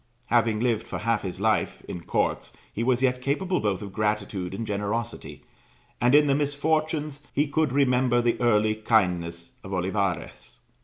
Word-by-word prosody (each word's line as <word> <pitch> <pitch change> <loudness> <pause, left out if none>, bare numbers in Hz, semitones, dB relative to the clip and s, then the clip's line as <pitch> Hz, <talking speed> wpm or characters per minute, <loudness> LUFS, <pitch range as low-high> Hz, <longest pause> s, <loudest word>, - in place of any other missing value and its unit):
Having 115 -2 +2
lived 115 -3 0
for - - -4
half 115 0 0
his 95 -1 -5
life 110 0 0
in 85 - -6
courts, - - -1 0.2
he 115 - -2
was 130 +1 +2
yet 125 -1 +2
capable 180 +8 0
both 100 -2 -1
of 100 -1 -8
gratitude 105 -4 -1
and 115 - -4
generosity, 105 +3 -4 0.6
and 125 +3 +5
in 150 0 +6
the 140 - +3
misfortunes, 150 +1 0
he 145 - +3
could 155 -1 0
remember 125 -2 +3
the 120 -1 +1
early 110 -2 +3
kindness 90 -6 0
of 95 - -7
Olivares. 90 - -2
115 Hz, 160 wpm, -26 LUFS, 100-135 Hz, 0.6 s, in